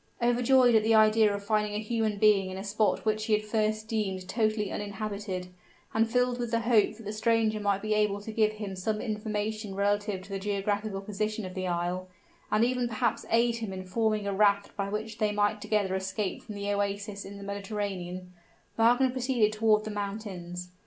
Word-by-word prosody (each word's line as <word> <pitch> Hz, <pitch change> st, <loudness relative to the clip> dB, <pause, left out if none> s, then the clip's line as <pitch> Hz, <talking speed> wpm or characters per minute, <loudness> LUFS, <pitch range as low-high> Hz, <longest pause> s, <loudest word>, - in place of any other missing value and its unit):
Overjoyed 245 Hz, +1 st, +4 dB
at 220 Hz, -, +6 dB
the 220 Hz, +1 st, +3 dB
idea 215 Hz, 0 st, +5 dB
of 200 Hz, 0 st, -4 dB
finding 210 Hz, -1 st, +1 dB
a -, -, 0 dB
human 220 Hz, -1 st, -1 dB
being 200 Hz, -2 st, +4 dB
in 185 Hz, -, -6 dB
a 195 Hz, -, -5 dB
spot 210 Hz, +1 st, 0 dB
which 215 Hz, 0 st, 0 dB
he 220 Hz, -, +1 dB
had 210 Hz, 0 st, +2 dB
at -, -, -13 dB
first 215 Hz, 0 st, 0 dB
deemed 195 Hz, -4 st, -2 dB
totally 215 Hz, -2 st, 0 dB
uninhabited, 200 Hz, -3 st, -4 dB, 0.4 s
and 225 Hz, 0 st, +2 dB
filled 250 Hz, +1 st, +1 dB
with 240 Hz, -1 st, -2 dB
the 230 Hz, 0 st, +1 dB
hope 225 Hz, -2 st, +3 dB
that 230 Hz, -, -11 dB
the 210 Hz, +1 st, -5 dB
stranger 220 Hz, 0 st, +2 dB
might 200 Hz, -1 st, 0 dB
be 215 Hz, 0 st, 0 dB
able 210 Hz, -1 st, +1 dB
to 220 Hz, -, -6 dB
give 215 Hz, -1 st, +2 dB
him 205 Hz, -3 st, -6 dB
some 210 Hz, +3 st, -2 dB
information 215 Hz, -2 st, -3 dB
relative 205 Hz, -1 st, 0 dB
to 195 Hz, -, -14 dB
the 195 Hz, 0 st, -3 dB
geographical 205 Hz, 0 st, -2 dB
position 215 Hz, +1 st, -3 dB
of 185 Hz, -, -7 dB
the 185 Hz, 0 st, -3 dB
isle, 175 Hz, +1 st, -2 dB, 0.4 s
and 215 Hz, +2 st, +4 dB
even 250 Hz, 0 st, 0 dB
perhaps 220 Hz, -2 st, -1 dB
aid 235 Hz, +1 st, +3 dB
him 220 Hz, -4 st, -4 dB
in 185 Hz, 0 st, -5 dB
forming 215 Hz, +2 st, 0 dB
a 200 Hz, -, -1 dB
raft 200 Hz, 0 st, +2 dB
by 200 Hz, -1 st, -2 dB
which 215 Hz, +2 st, -4 dB
they 215 Hz, -2 st, +2 dB
might 205 Hz, 0 st, +1 dB
together 210 Hz, -3 st, 0 dB
escape 190 Hz, +1 st, -2 dB
from 215 Hz, -, -9 dB
the 200 Hz, 0 st, -2 dB
oasis 200 Hz, 0 st, -2 dB
of 200 Hz, +1 st, -9 dB
the 200 Hz, -, -9 dB
Mediterranean, 195 Hz, -3 st, -4 dB, 0.4 s
Wagner 245 Hz, +3 st, +4 dB
proceeded 250 Hz, -4 st, +1 dB
toward 215 Hz, -1 st, +3 dB
the 215 Hz, -, -5 dB
mountains. 195 Hz, -4 st, -5 dB
210 Hz, 200 wpm, -29 LUFS, 200-220 Hz, 0.4 s, at